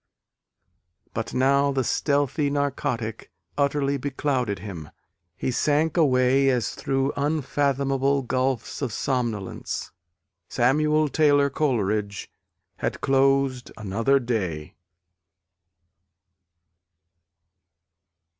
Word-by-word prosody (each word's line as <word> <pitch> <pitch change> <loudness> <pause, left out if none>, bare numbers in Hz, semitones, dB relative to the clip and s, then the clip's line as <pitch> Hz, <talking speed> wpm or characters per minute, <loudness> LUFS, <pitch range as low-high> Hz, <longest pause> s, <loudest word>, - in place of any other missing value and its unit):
But - - -3
now 140 +2 +3
the 135 -1 0
stealthy 145 +3 +1
narcotic 125 -8 -2 0.2
utterly 140 -1 +1
beclouded 130 -5 -1
him: 85 -7 -8 0.5
he - - -1
sank 150 +5 +1
away 135 -3 +3
as 125 -4 0
through 135 +1 -1
unfathomable 140 -2 0
gulfs 130 0 -1
of 130 -5 -2
somnolence. 115 -5 -3 0.6
Samuel 150 +5 +2
Taylor 145 -1 +3
Coleridge 105 -8 -1 0.5
had - - -3
closed 135 -2 +2
another 115 +6 +1
day. 95 - -3
135 Hz, 80 wpm, -25 LUFS, 120-140 Hz, 0.6 s, now